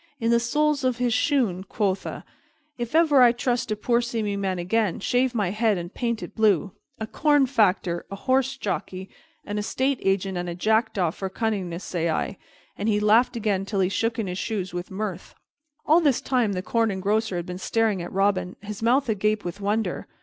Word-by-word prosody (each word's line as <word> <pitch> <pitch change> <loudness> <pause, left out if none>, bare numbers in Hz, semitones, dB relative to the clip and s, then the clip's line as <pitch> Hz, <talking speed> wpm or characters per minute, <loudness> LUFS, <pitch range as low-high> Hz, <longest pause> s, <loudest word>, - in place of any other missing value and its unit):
In 230 -1 +1
the 235 - +4
soles 295 +4 +1
of 255 -2 +1
his 245 -2 +1
shoon, 240 - +1
quotha! 195 -1 -2 0.5
If 240 +3 -4
ever 310 -5 +5
I 245 -1 +8
trust 240 0 -1
a 215 - 0
poor 235 +3 +1
seeming 220 -4 -2
man 190 -2 -1
again, 190 +2 0
shave 250 +4 +1
my 200 -5 0
head 215 -1 +1
and 175 +2 -6
paint 235 -2 -2
it - - -8
blue! 205 -4 +2 0.3
A 220 - -2
corn 290 +4 +3
factor, 195 -8 +1
a 200 - -5
horse 265 +5 0
jockey, 190 -3 -4 0.3
an 205 0 -3
estate 260 +5 0
agent, 195 -1 0
and 175 0 -4
a 170 - -4
jackdaw 215 -3 +1
for 190 +3 -5
cunningness, 190 -5 -2
say 170 -2 -2
I!" 180 +4 -2 0.4
And 205 +2 -2
he 210 -1 +2
laughed 220 +4 +4
again 205 -4 0
till 200 0 -3
he 185 -1 +2
shook 225 +3 -1
in 225 - -1
his 180 0 -4
shoes 190 -5 -3
with 175 0 -5
mirth. 190 -2 -5 0.5
All 320 +3 +5
this 280 -6 +3
time 245 -6 0
the 180 -1 -3
Corn 230 +3 +1
Engrosser 205 +1 0
had 175 -1 -3
been 180 0 -6
staring 220 -2 0
at 175 - -6
Robin, 195 -1 0
his 210 0 -7
mouth 250 +4 +3
agape 215 -1 0
with 175 +3 -5
wonder. 205 -2 -1
210 Hz, 200 wpm, -25 LUFS, 190-235 Hz, 0.5 s, I